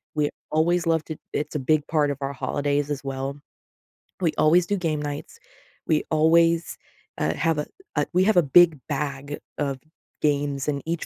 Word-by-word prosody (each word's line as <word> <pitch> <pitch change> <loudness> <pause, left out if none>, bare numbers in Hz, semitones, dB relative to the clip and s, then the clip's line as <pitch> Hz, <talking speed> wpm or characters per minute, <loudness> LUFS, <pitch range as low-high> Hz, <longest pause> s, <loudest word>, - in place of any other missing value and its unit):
we 150 -1 +1 0.2
always 165 +2 +2
love 160 -1 +2
to 155 - -6 0.2
it's 150 - -3
a - - +1
big 145 +2 +1
part 150 -2 +2
of 140 - -4
our 135 0 -2
holidays 145 +1 -1
as 140 -1 -3
well. 135 +1 -4 0.8
We 165 -4 +2
always 170 +3 +4
do 205 - 0
game 160 -5 -1
nights, 145 -1 -6 0.5
we 155 -1 +2
always, 165 +2 +3 0.4
uh, 80 +1 +1
have 165 -1 +1
a 150 - -1 0.3
uh, 145 -1 +2
we 185 +1 +4
have 215 -3 +3
a 175 - +6
big 160 +1 +5
bag 140 0 -3 0.2
of 140 -3 -2 0.4
games, 145 -1 0
and 140 -2 -1
each 165 0 -2
150 Hz, 180 wpm, -24 LUFS, 140-165 Hz, 0.8 s, a